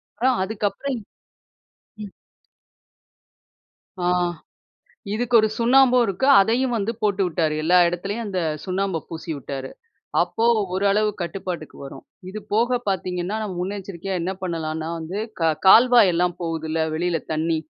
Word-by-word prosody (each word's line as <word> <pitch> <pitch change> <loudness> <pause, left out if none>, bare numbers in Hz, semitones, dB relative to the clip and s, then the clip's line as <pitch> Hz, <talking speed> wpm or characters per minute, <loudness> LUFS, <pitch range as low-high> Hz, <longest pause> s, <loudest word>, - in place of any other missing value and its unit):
அப்பறம் 255 -2 -1
அதுக்கு 205 +1 -2
அப்புறம், 260 +6 -4 1.0
ம். 205 -2 -8 1.9
ஆ, 175 - -2 1.1
இதுக்கு 245 +2 -2
ஒரு 215 - +2
சுண்ணாம்பு 250 +2 +5
இருக்கு. 195 +6 -1
அதையும் 240 +5 +1
வந்து 215 +2 -1
போட்டுவிட்டாரு. 180 -6 0
எல்லா 180 +3 +4
இடத்துலயும் 200 +6 -4
அந்த 190 -3 -2 0.2
சுண்ணாம்பு 190 -1 -1
பூசிவிட்டாரு.அப்போ 160 - -4 0.3
ஓரளவு 200 +3 +2
கட்டுப்பாட்டுக்கு 175 -2 -6
வரும். 135 - -10 0.3
இது 210 - -6 0.2
போக 240 +3 +2
பார்த்தீங்கன்னா, 185 +1 -2
நம்ம 205 -4 -4
முன்னெச்சரிக்கையா 195 -1 -5
என்ன 185 +3 -2
பண்ணலான்னா 160 -3 -3
வந்து 165 +5 -5 0.2
க 160 -1 +3
கால்வாய் 235 -1 +7
எல்லாம் 175 +1 +1
போகுதுல்ல 160 -1 -2
வெளில 170 0 -1
தண்ணீ, 160 +1 0
190 Hz, 115 wpm, -22 LUFS, 165-215 Hz, 1.9 s, கால்வாய்